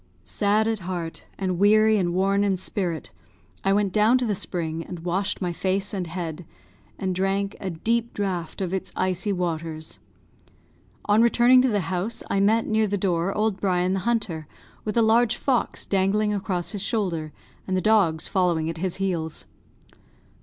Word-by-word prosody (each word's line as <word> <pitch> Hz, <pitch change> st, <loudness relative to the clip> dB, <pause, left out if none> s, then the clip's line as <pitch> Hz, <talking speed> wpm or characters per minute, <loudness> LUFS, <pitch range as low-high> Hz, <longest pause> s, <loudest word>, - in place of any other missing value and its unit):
Sad 205 Hz, -, +1 dB
at 225 Hz, -2 st, 0 dB
heart, 175 Hz, -3 st, -5 dB
and 185 Hz, -2 st, -2 dB
weary 215 Hz, +2 st, +5 dB
and 175 Hz, -2 st, 0 dB
worn 195 Hz, +3 st, +2 dB
in 195 Hz, -2 st, +1 dB
spirit, 175 Hz, -, -3 dB, 0.5 s
I 195 Hz, -, +2 dB
went 200 Hz, -1 st, +1 dB
down 220 Hz, +4 st, +4 dB
to 250 Hz, -, -1 dB
the 215 Hz, -, 0 dB
spring 165 Hz, -4 st, -3 dB
and 175 Hz, 0 st, -8 dB
washed 190 Hz, +3 st, -1 dB
my 175 Hz, -1 st, -1 dB
face 190 Hz, +3 st, -1 dB
and 185 Hz, -3 st, -2 dB
head, 170 Hz, 0 st, -5 dB, 0.5 s
and 190 Hz, -1 st, -2 dB
drank 195 Hz, +2 st, -1 dB
a 190 Hz, -, -3 dB
deep 230 Hz, +7 st, 0 dB
draught 185 Hz, -4 st, -3 dB
of 185 Hz, -1 st, -2 dB
its 190 Hz, -, -3 dB
icy 185 Hz, +2 st, -1 dB
waters. 165 Hz, -3 st, -3 dB, 1.1 s
On 210 Hz, +2 st, +4 dB
returning 240 Hz, +2 st, +6 dB
to 260 Hz, -, +2 dB
the 205 Hz, -3 st, +1 dB
house 185 Hz, +5 st, -3 dB
I 200 Hz, -, +2 dB
met, 220 Hz, +3 st, +3 dB
near 220 Hz, 0 st, +2 dB
the 205 Hz, 0 st, -1 dB
door, 180 Hz, -1 st, 0 dB
old 210 Hz, -2 st, 0 dB
Brian 185 Hz, -1 st, +1 dB
the 195 Hz, -, 0 dB
hunter, 190 Hz, -8 st, -2 dB, 0.4 s
with 215 Hz, +1 st, -2 dB
a 230 Hz, -, +5 dB
large 230 Hz, +1 st, +4 dB
fox 255 Hz, -1 st, -1 dB
dangling 205 Hz, +2 st, +1 dB
across 190 Hz, -4 st, -2 dB
his 205 Hz, -, -4 dB
shoulder, 185 Hz, -8 st, -1 dB, 0.4 s
and 185 Hz, -1 st, 0 dB
the -, -, +2 dB
dogs 190 Hz, -7 st, +3 dB
following 170 Hz, -4 st, +1 dB
at 165 Hz, -, -9 dB
his 185 Hz, 0 st, -1 dB
heels. 170 Hz, -5 st, -2 dB
195 Hz, 175 wpm, -25 LUFS, 175-210 Hz, 1.1 s, returning